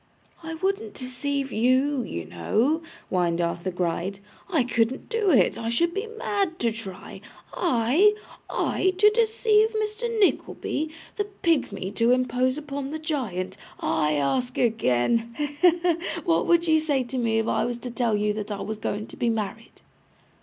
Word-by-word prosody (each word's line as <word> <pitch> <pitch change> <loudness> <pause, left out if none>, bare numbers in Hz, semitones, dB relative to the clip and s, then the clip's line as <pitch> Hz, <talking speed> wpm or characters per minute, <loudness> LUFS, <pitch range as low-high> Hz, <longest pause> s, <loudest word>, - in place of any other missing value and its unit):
'I 325 0 -6
wouldn't 395 +5 -2
deceive 270 +2 -3
YOU, 255 +4 +2
you 85 - -5
know,' 220 - 0 0.3
whined 175 -2 +1
Arthur 170 +1 -1
Gride; 180 +2 -2 0.3
'I 320 -8 +2
couldn't 240 +1 0
do 445 -4 +1
it, 240 - +4
I 225 - -2
should 340 +9 +1
be 405 +4 -3
mad 410 -6 -2
to 235 -1 +1
try. 200 -3 -8 0.3
I, 320 - +3 0.3
I, 375 0 +1
to 420 +2 +6
deceive 440 -1 +3
Mr. 435 +2 -1
Nickleby! 315 -5 0 0.3
The 410 - 0
pigmy 300 - -1
to 230 0 +3
impose 255 +1 +1
upon 285 -2 -5
the 310 - -4
giant. 255 - -3 0.2
I 155 -1 +1
ask 245 - 0
again 230 - +1
he, 295 - 0
he, 295 +5 +4
he! 345 -1 +2 0.3
what 335 -2 +2 0.2
should - - -6
you 315 -1 +5
say 290 -4 +1
to 250 +1 -4
me 225 -2 +1
if 225 0 0
I 220 - +1
was 240 -1 -2
to 245 0 -7
tell 235 -2 +1
you 210 0 +1
that 210 0 -5
I 200 - -3
was 220 0 -4
going 210 0 -3
to - - -12
be 235 - 0
married? 225 0 -4
255 Hz, 165 wpm, -25 LUFS, 220-335 Hz, 0.3 s, to